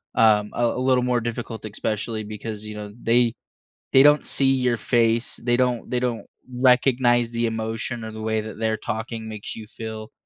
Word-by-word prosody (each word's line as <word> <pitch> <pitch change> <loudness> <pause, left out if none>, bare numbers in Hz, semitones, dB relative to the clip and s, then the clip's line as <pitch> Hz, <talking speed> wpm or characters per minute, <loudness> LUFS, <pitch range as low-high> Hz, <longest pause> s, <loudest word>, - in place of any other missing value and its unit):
um, 105 -2 +4
a 120 - +1
a 115 - 0
little 130 -1 +2
more 125 -1 +1
difficult 115 -1 -5
especially 110 +1 -3
because, 105 0 -6
you 105 0 -7
know, 105 -1 -7
they 120 0 +3 0.6
they 135 +1 +8
don't 150 0 +5
see 135 -1 +3
your 125 -2 +1
face. 115 0 +1
They 120 0 +3
don't 125 -2 0
they 125 - 0
don't 120 -2 -2 0.3
recognize 125 -1 +3
the 115 0 -1
emotion 115 +1 -3
or 110 - -6
the 110 0 -8
way 110 0 0
that 110 0 -9
they're 110 -1 0
talking 110 0 -5
makes 105 -1 -7
you 110 - -8
feel, 110 -1 -7
115 Hz, 185 wpm, -23 LUFS, 110-125 Hz, 0.6 s, they